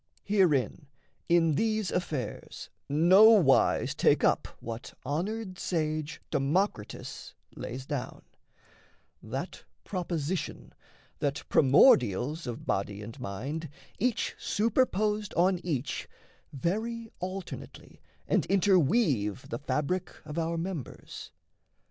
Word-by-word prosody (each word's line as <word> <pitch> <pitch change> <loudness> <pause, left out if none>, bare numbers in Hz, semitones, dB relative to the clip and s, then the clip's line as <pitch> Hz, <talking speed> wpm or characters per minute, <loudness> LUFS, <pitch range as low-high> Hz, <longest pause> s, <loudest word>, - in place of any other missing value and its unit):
Herein 170 -8 +2 0.4
in 165 -2 +4
these 215 +3 0
affairs 150 - -4 0.2
nowise 180 +1 +5
take - - +3
up - - +3
What 115 +1 -7
honoured 185 - -3
sage, 155 -2 -2
Democritus, 145 - -2 0.2
lays 130 +3 -6
down 135 -4 -5 1.0
That - - -6 0.2
proposition, 175 -2 -3 0.5
that 140 0 -1
primordials 135 - +4
Of 120 -1 -6
body 100 +1 -2
and 115 +6 -9
mind, 135 +9 -4 0.3
each 240 +2 0
super 230 +4 +2
posed 210 0 -1
on 180 +1 +3
each, 145 -6 -2 0.4
Vary 220 - -2
alternately 185 +1 -7 0.3
and - - +1
interweave 160 - +2
The - - -4
fabric 150 +5 -1 0.2
of 150 +3 -4
our 165 +1 -1
members. 165 - -6
165 Hz, 95 wpm, -29 LUFS, 135-195 Hz, 1.0 s, nowise